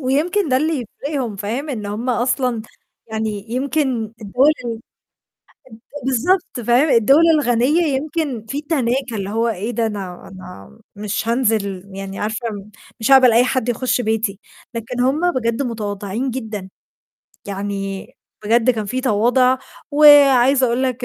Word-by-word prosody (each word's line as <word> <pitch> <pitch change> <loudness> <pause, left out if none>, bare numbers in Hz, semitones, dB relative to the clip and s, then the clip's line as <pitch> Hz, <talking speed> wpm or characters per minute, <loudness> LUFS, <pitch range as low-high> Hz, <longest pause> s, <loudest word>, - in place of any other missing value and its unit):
ويمكن 310 +8 0
ده 255 - +3
اللي 300 -3 0 0.2
يفرقهم، 260 -8 -3
فاهم، 230 +10 -4
إن 215 -6 -4
هم 220 +5 -3
أصلًا 245 -1 0 0.4
يعني 220 -2 -4
يمكن 255 -4 -1
الدولة 250 +9 +3
ال 235 - -2 1.1
اد 280 0 -11
بالضبط، 265 +3 0
فاهم؟ 255 +6 +4
الدَول 270 +5 +5
الغنية 270 +3 +2 0.2
يمكن 285 -6 -3
في 280 +5 -3
تناكة، 260 -5 -1
اللي 195 -2 -4
هو 225 +3 0
إيه 220 +2 -3
ده 235 -1 -1
أنا 195 -5 -6
أنا 180 - -12 0.2
مش 210 +1 -3
هانزل 220 -6 0
يعني 195 0 -6
عارفة 220 +3 -3
م 205 0 -9 0.3
مش 225 +4 0
هاقبل 260 -3 +7
أي 235 +2 +5
حد 255 -2 -1
يخُش 250 +1 0
بيتي، 220 -3 -1 0.4
لكن 230 +2 -5
هم 300 +8 +2
بجد 235 -2 -1
متواضعين 215 0 -3
جدًا، 220 -6 -6 0.8
يعني 195 -1 -4 0.4
بجد 230 +3 +3
كان 220 -3 -2
في 255 +5 -3
تواضع 250 +2 +2 0.3
وعايزة 280 -3 +6
أقول 240 +2 0
لك 255 -1 -1
240 Hz, 145 wpm, -19 LUFS, 210-265 Hz, 1.1 s, هاقبل